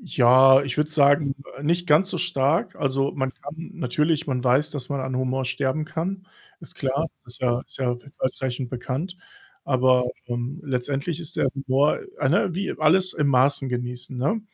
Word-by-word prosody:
Ja, 130 Hz, -, +6 dB
ich 135 Hz, -1 st, -4 dB
würde 150 Hz, +1 st, 0 dB
sagen, 145 Hz, -1 st, +4 dB, 0.2 s
äh, -, -, -9 dB
nicht 175 Hz, +3 st, 0 dB
ganz 170 Hz, +5 st, +4 dB
so 180 Hz, -, -2 dB
stark. 165 Hz, -, +1 dB
Also, 135 Hz, 0 st, 0 dB
man 130 Hz, -2 st, -2 dB
kann 160 Hz, +5 st, -9 dB
natürlich 155 Hz, +1 st, 0 dB
man 130 Hz, -3 st, -1 dB
weiß, 130 Hz, +5 st, +2 dB
dass 135 Hz, -4 st, -6 dB
man 140 Hz, -1 st, -2 dB
an 130 Hz, -1 st, -3 dB
Humor 130 Hz, +1 st, -1 dB
sterben 130 Hz, +4 st, -1 dB
kann, 185 Hz, +4 st, -4 dB, 0.3 s
ist 165 Hz, -, -7 dB
klar, 140 Hz, +4 st, -1 dB, 0.2 s
ist 120 Hz, -, -5 dB
ja 120 Hz, -1 st, +1 dB
ist -, -, -12 dB
ja 125 Hz, -2 st, 0 dB
w -, -, -23 dB
weitreichend 130 Hz, -1 st, -2 dB
bekannt. 135 Hz, +8 st, -4 dB, 0.5 s
Aber, 130 Hz, -1 st, +3 dB, 0.2 s
ähm, 120 Hz, +7 st, -4 dB
letztendlich 140 Hz, +5 st, -2 dB
ist 165 Hz, 0 st, -7 dB
der 135 Hz, -, +2 dB
Humor, 135 Hz, +1 st, +1 dB, 0.2 s
äh -, -, +1 dB
ne 175 Hz, -, +2 dB
wie 195 Hz, +2 st, -2 dB
alles 185 Hz, +4 st, +3 dB
in 150 Hz, -2 st, 0 dB
Maßen 135 Hz, +1 st, +3 dB
genießen, 125 Hz, +1 st, -4 dB
ne? 145 Hz, -, 0 dB
140 Hz, 180 wpm, -24 LUFS, 130-155 Hz, 0.5 s, Ja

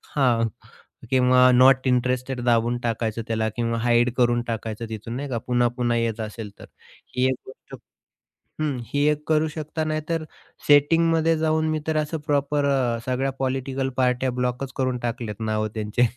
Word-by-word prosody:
हां. 120 Hz, -5 st, +3 dB, 0.6 s
किंवा 125 Hz, 0 st, +5 dB
not 130 Hz, +1 st, +5 dB
interested 125 Hz, +1 st, 0 dB
दाबून 120 Hz, 0 st, +2 dB
टाकायचं 115 Hz, -1 st, -2 dB
त्याला, 110 Hz, -1 st, 0 dB
किंवा 115 Hz, -1 st, -1 dB
हाईड 120 Hz, +1 st, +3 dB
करून 120 Hz, -1 st, +3 dB
टाकायचं 115 Hz, 0 st, -4 dB
तिथून 110 Hz, +1 st, -6 dB
नाही 140 Hz, +2 st, -4 dB
का 120 Hz, -, -2 dB
पुन्हा-पुन्हा 120 Hz, -1 st, +1 dB
येत 115 Hz, -1 st, -1 dB
असेल 110 Hz, -1 st, -6 dB
तर. -, -, -10 dB, 0.5 s
ही 125 Hz, 0 st, +2 dB
एक -, -, +2 dB
गोष्ट 130 Hz, -, -12 dB, 0.9 s
हं, 150 Hz, -3 st, 0 dB
ही 145 Hz, +4 st, 0 dB
एक 150 Hz, 0 st, 0 dB
करू 155 Hz, 0 st, +3 dB
शकता 155 Hz, +1 st, -4 dB
नाहीतर 155 Hz, +1 st, -2 dB, 0.4 s
सेटिंगमध्ये 165 Hz, +3 st, +4 dB
जाऊन 155 Hz, 0 st, +1 dB
मी 155 Hz, 0 st, 0 dB
तर 160 Hz, -1 st, 0 dB
असं 155 Hz, +1 st, -1 dB
प्रॉपर 145 Hz, 0 st, +1 dB
अ, 130 Hz, -4 st, +1 dB
सगळ्या 130 Hz, +1 st, 0 dB
पॉलिटिकल 135 Hz, 0 st, -2 dB
पार्ट्या 125 Hz, 0 st, +1 dB
ब्लॉकच 125 Hz, +2 st, -2 dB
करून 130 Hz, -1 st, 0 dB
टाकल्यात 115 Hz, -3 st, -5 dB
नावं 110 Hz, 0 st, 0 dB
त्यांचे 110 Hz, +2 st, -1 dB
125 Hz, 155 wpm, -24 LUFS, 120-145 Hz, 0.9 s, किंवा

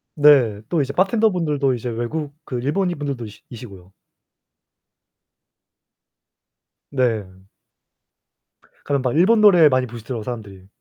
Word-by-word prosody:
네, 135 Hz, -9 st, +4 dB
또 165 Hz, -, +1 dB
이제 140 Hz, 0 st, -3 dB
바텐더 215 Hz, +5 st, +2 dB
분들도 150 Hz, -7 st, 0 dB
이제 120 Hz, 0 st, -4 dB
외국 140 Hz, +6 st, -4 dB
그 125 Hz, -2 st, -4 dB
일본인 175 Hz, +4 st, -1 dB
분들도 140 Hz, -5 st, -4 dB
이시 105 Hz, -, -13 dB
이시고요. 100 Hz, -6 st, -12 dB, 3.0 s
네. 110 Hz, -8 st, -2 dB, 1.4 s
가면 140 Hz, -1 st, -1 dB
막 125 Hz, +1 st, -2 dB
일본 215 Hz, +7 st, +4 dB
노래 180 Hz, -7 st, +7 dB
많이 130 Hz, -1 st, 0 dB
부르시더라고요, 115 Hz, 0 st, -7 dB
사람들이. 105 Hz, -6 st, -8 dB
130 Hz, 265 characters per minute, -21 LUFS, 115-155 Hz, 3.0 s, 노래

